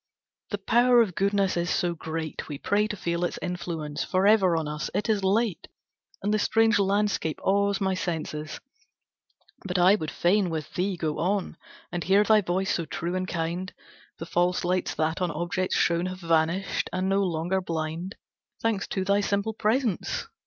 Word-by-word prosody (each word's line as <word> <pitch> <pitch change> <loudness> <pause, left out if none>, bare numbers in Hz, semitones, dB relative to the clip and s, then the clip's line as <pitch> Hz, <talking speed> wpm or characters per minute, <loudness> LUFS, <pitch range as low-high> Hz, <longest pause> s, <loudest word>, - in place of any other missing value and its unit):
"The 205 - -2
power 240 +4 +4
of 195 -5 -5
goodness 195 +1 +1
is 175 0 -1
so 175 -1 +1
great 160 -1 -5
We 145 - -4
pray 205 +7 +1
to 210 - -4
feel 170 0 -2
its 175 - -1
influence 170 -4 -4
For 185 +1 +1
ever 195 -5 +5
on 160 -2 -2
us. 150 0 -4
It 210 - 0
is 210 -3 +1
late, 205 +1 +1 0.6
And 210 - +1
the 215 - +2
strange 225 0 +3
landscape 200 -5 0
awes 200 0 +2
my 190 -1 +1
sense; 160 -3 -4 1.0
But 185 -1 -2
I 180 +2 +6
would 160 -7 -1
fain 185 +1 +2
with 160 -2 -5
thee 185 +1 -1
go 155 -3 -2
on, 190 0 -1 0.4
And 175 -1 -3
hear 195 +3 +4
thy 215 0 +5
voice 185 +1 0
so 170 - -1
true 170 +1 -3
and 185 0 -2
kind; 170 +2 -3 0.5
The 165 - -6
false 175 +1 +1
lights 180 +1 0
that 160 +3 -1
on 180 - +1
objects 175 +2 -2
shone 170 +1 +2
Have 185 0 -7
vanished, 165 +3 +1
and 185 +1 -1
no 195 +1 +2
longer 180 +1 0
blind, 165 +1 -4 0.4
Thanks 225 -3 -1
to 190 -1 -2
thy 200 +1 +3
simple 200 +2 -1
presence. 225 -1 0
185 Hz, 180 wpm, -26 LUFS, 170-200 Hz, 1.0 s, I